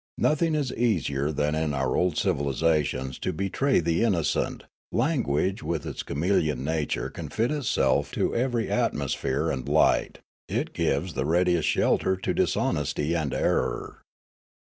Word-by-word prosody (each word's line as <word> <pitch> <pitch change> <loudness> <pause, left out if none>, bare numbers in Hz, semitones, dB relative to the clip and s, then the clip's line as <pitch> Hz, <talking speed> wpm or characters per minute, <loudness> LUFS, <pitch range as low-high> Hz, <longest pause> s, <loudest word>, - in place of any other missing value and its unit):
Nothing 155 +1 +2
is 145 -4 -1
easier 75 - 0
than 75 0 0
in 80 -2 -1
our 65 -1 0
old 90 -4 +1
civilisations 70 -4 0
to - - -1
betray 100 - +1
the 85 +1 0
innocent; 90 -9 0 0.3
language 115 - 0
with 80 -4 -3
its - - -4
chameleon 75 -4 0
nature 80 0 -2
can - - -7
fit 115 +5 0
itself 70 - +1
to - - 0
every 120 -2 0
atmo 70 -1 0
sphere 65 0 -1
and 65 -2 -4
light; - - +3 0.3
it - - -2
gives 80 +6 0
the 65 0 -1
readiest 85 0 +2
shelter 95 - +2
to 95 - -2
dis - - +1
honesty 75 +2 0
and 80 -5 -1
error. - - -1
80 Hz, 150 wpm, -26 LUFS, 70-100 Hz, 0.3 s, light